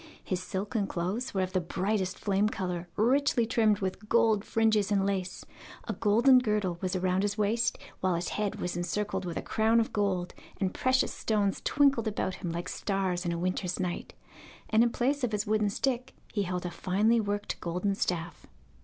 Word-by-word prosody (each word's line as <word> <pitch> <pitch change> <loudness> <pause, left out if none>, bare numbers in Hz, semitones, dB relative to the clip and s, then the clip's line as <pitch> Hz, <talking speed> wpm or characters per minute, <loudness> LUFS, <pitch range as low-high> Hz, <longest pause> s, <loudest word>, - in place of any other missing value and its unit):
His 185 -1 -2
silken 200 +2 -2
clothes 190 +9 -2
were 190 - +2
of 185 0 -2
the 185 - +2
brightest 190 +2 -1
flame 200 +1 +1
colour, 180 -4 -3
richly 250 +1 +3
trimmed 220 -3 +2
with 190 +3 -4
gold 220 -3 +3
fringes 220 -3 +2
and 195 -1 +2
lace; 190 -2 -2 0.4
a - - -1
golden 240 +5 +5
girdle 210 -7 -1
was 185 -1 -1
round 185 +1 +1
his 205 +1 -1
waist, 220 +2 +1 0.2
while 185 -2 +1
his 170 +1 -2
head 210 -1 -2
was 180 - -3
encircled 190 +2 -2
with 170 -2 -4
a - - -3
crown 225 +1 +2
of 230 - -1
gold, 190 -4 0 0.3
and 190 -2 0
precious 255 0 +1
stones 205 -3 0
twinkled 275 -6 +3
about 200 -3 -1
him 175 -3 -3
like 170 +1 -4
stars 190 -3 -1
in - - +1
a 170 - -2
winter's 185 +1 -2
night, 180 -2 -3 0.6
and 220 +1 +5
in 240 - +4
place 270 +4 0
of 235 -3 0
his 210 +1 0
wooden 215 -1 +2
stick 255 +4 -2 0.2
he 205 - +1
held 180 -2 -2
a 175 - -3
finely 210 +7 +2
worked 205 0 -3
golden 180 +4 -1
staff. 175 -3 -3
200 Hz, 190 wpm, -29 LUFS, 185-220 Hz, 0.6 s, golden